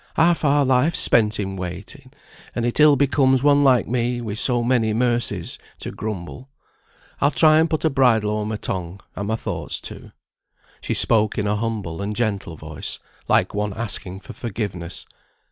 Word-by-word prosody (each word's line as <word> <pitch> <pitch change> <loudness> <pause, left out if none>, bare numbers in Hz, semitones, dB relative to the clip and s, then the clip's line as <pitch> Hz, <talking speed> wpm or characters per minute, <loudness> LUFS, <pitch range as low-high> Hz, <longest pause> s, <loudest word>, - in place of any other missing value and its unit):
Half 170 +1 +3
our 145 -1 +3
life's 130 +6 +2
spent 105 -2 +3
in 95 -1 -3
waiting, 95 - -8 0.4
and 120 - -1
it 120 +4 0
ill 150 -1 +7
becomes 135 -1 +2
one 145 0 +4
like 130 -5 +3
me, 120 0 -1
wi' 110 -4 -5
so 120 +2 +3
many 115 -3 +1
mercies, 120 -7 0 0.2
to - - -5
grumble. 105 +5 -7 0.7
I'll 140 - +3
try 155 +3 +4
and 160 +1 +2
put 155 0 -1
a - - +4
bridle 120 -6 +3
o'er 105 0 -2
my 110 - -3
tongue, 95 -2 -5
and 100 +1 -4
my 110 - 0
thoughts - - -3
too." - - -10 0.7
She - - -2
spoke 110 -2 +4
in 105 - -1
a 105 +1 0
humble 105 -6 -4
and 105 +1 -3
gentle 100 -8 -2
voice, 80 0 -6 0.3
like - - +2
one 105 -1 -2
asking 100 -4 -3
forgiveness. 100 -8 -5
115 Hz, 170 wpm, -22 LUFS, 100-130 Hz, 0.7 s, ill